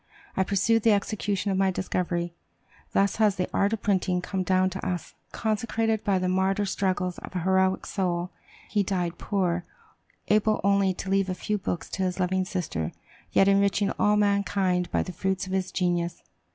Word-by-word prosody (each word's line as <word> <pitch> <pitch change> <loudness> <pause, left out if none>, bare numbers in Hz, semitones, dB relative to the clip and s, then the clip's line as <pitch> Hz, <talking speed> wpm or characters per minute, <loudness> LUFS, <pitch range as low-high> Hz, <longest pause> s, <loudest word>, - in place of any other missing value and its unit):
I 190 - +3
pursued 200 +4 +2
the 225 0 +5
execution 200 -1 -1
of 190 - 0
my 195 -1 +3
discovery.'" 175 -2 -2 0.6
Thus 200 0 +2
has 215 -3 +3
the 180 -2 -1
art 200 +1 +2
of 225 - -3
printing 185 -2 +1
come 185 +1 -3
down 185 0 +2
to 190 - -6
us 180 -2 -3 0.2
consecrated 225 0 -1
by 195 -2 +2
the 185 0 0
martyr 190 +2 +1
struggles 185 -2 -1
of - - -10
a 180 - 0
heroic 190 +1 +2
soul. 180 -2 -1 0.4
He 205 - +1
died 180 -3 -2
poor, 180 -4 0 0.6
able 215 0 +3
only 200 -1 +3
to 190 - -5
leave 195 -1 +2
a 185 - -1
few 210 +3 -2
books 175 -2 -3
to 190 - -3
his 185 0 -1
loving 185 +1 +1
sister, 170 - -3 0.4
yet 195 - +4
enriching 200 0 +3
all 210 0 +4
mankind 200 -3 +1
by - - +1
the 180 - -7
fruits 190 +2 -1
of 190 - -6
his 190 -1 -1
genius. 175 -2 -1
190 Hz, 180 wpm, -26 LUFS, 180-200 Hz, 0.6 s, the